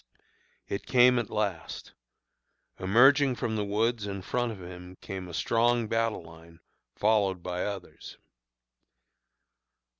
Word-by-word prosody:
It 100 - -5
came 125 -1 +5
at 115 - -4
last. 100 -6 -3 0.9
Emerging 130 +7 +5
from 110 -2 -2
the 105 - -1
woods 105 +1 0
in 100 -1 -5
front 120 +3 -1
of 105 - -9
him 90 0 -10
came 95 -1 -7
a - - -9
strong 120 0 +2
battle 115 -4 -1
line 80 0 -15 0.4
followed 100 -4 +1
by 90 0 -3
others. 100 -3 -7
105 Hz, 120 wpm, -28 LUFS, 90-115 Hz, 0.9 s, came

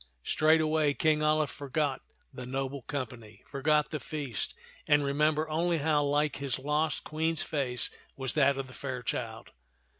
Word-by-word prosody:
Straightway 155 - +3
King 155 -1 +2
Alia 155 0 +3
forgot 140 +1 -2 0.3
the 125 -1 -7
noble 135 +1 -3
company, 115 -6 -6
forgot 150 +2 +1
the 150 - -2
feast, 140 -10 -4 0.3
and 150 -1 +5
remembered 150 +2 +1
only 170 +2 +1
how 150 -1 +2
like 145 +1 +1
his 135 -3 -1
lost 150 +3 0
Queen's 160 +1 -1
face 130 -5 0 0.3
was 130 -2 -1
that 140 -2 +4
of 135 - -2
the 130 - -13
fair 130 -3 -5
child. - - -4
145 Hz, 150 wpm, -30 LUFS, 135-155 Hz, 0.3 s, and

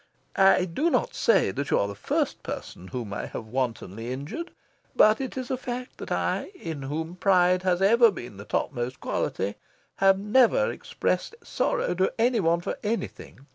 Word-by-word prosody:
I 190 -1 +5
do 265 - 0
not - - 0
say 475 - +3
that 140 0 -4
you - - +3
are 100 - +1
the 100 - -5
first 100 - -1
person 90 - -7
whom 105 +1 -5
I - - -4
have 110 - -6
wantonly 115 -2 -3
injured. 145 - -5 0.5
But 215 +4 +5
it 265 0 -5
is 255 -1 -4
a 260 - 0
fact 250 0 -6
that - - -7
I, - - 0
in 160 - -6
whom 160 +5 -4
pride 185 -1 +4
has 185 0 +1
ever 230 +3 +6
been 120 - -8
the 100 - -9
topmost 125 +1 -2
quality, 100 +2 -2 0.4
have 195 0 +5
never 255 - +3
expressed - - -2
sorrow - - 0
to 185 +2 +1
any 235 0 +3
one 170 -2 +2
for - - -4
anything. 210 - -4
180 Hz, 175 wpm, -26 LUFS, -, 0.5 s, ever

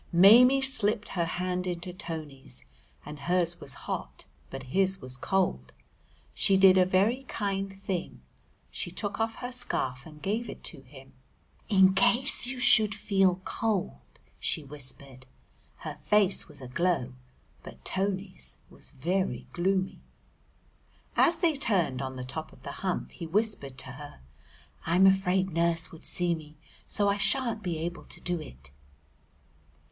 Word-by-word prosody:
Maimie 240 +10 +7
slipped 220 -5 +1
her 175 -3 -1
hand 180 +2 -2
into 175 0 -4
Tony's, 150 - -7 0.4
and 150 0 -8
hers 175 +3 +1
was 135 - -3
hot, - - -5 0.2
but 135 0 -7
his 190 0 +3
was 130 -5 -6
cold. 190 +8 -1 0.6
She 195 -2 +4
did 190 -1 +7
a 185 -1 +5
very 205 +8 +2
kind 195 -4 -2
thing; 190 -3 -4 0.5
she - - -3
took 205 0 -3
off 225 0 0
her 245 0 -5
scarf 135 - -2
and 150 -1 -13
gave 215 +7 -2
it - - -9
to 135 - -3
him! 135 0 -15 0.6
"In 190 -2 +6
case 245 +4 +3
you 255 0 -4
should 220 -3 +4
feel 195 -3 +2
cold," 210 - -1 0.4
she 155 - 0
whispered. 135 -2 -6 0.5
Her 150 -1 -6
face 195 +5 +2
was 150 -3 -12
aglow, 130 0 -1 0.5
but - - -13
Tony's 190 0 -2
was - - -10
very 175 +7 -2
gloomy. 190 +2 0 1.2
As 335 -1 +4
they 335 -2 +3
turned 180 - +1
on 130 -1 -4
the 130 - -5
top 155 +5 -6
of - - -18
the - - -5
Hump 185 -2 -2
he 170 - -7
whispered 190 - -1
to 130 0 -4
her, 145 - -10 0.6
"I'm 180 +4 +4
afraid 190 0 +3
Nurse 170 0 +1
would 165 - -9
see 175 -1 +2
me, 155 -2 -8 0.3
so 205 0 +2
I 200 0 +2
sha'n't 225 +2 +1
be 175 -5 -2
able 170 +2 -5
to - - -9
do 175 -1 -2
it." 65 - -11
185 Hz, 150 wpm, -28 LUFS, 150-200 Hz, 1.2 s, Maimie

